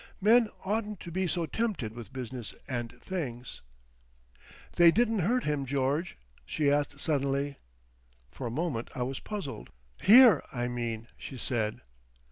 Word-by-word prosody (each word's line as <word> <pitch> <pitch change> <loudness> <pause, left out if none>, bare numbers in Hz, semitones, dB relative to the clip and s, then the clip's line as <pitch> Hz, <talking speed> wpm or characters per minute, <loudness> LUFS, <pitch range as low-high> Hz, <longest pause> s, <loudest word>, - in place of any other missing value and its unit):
"Men 220 +3 +5 0.2
oughtn't 210 0 -2
to 170 - -8
be 185 +2 0
so 170 0 0
tempted 195 - -2
with 115 -4 -9
business 125 -3 -6
and 120 -3 -3
things.... 125 -10 -5 1.2
"They 175 -1 +8
didn't 225 +3 +2
hurt 240 +8 +1
him, 150 -2 0
George?" 140 +5 -1 0.3
she 145 -2 +1
asked 145 0 0
suddenly. 140 -1 0 0.7
For 125 - -5
a - - -3
moment 130 -2 -2
I 125 - -1
was 130 +2 -3
puzzled. 200 -10 -6 0.3
"Here, 225 - +8
I 120 -1 -2
mean," 120 -2 -3
she 135 - -7
said. 110 -3 -1
145 Hz, 140 wpm, -30 LUFS, 125-190 Hz, 1.2 s, They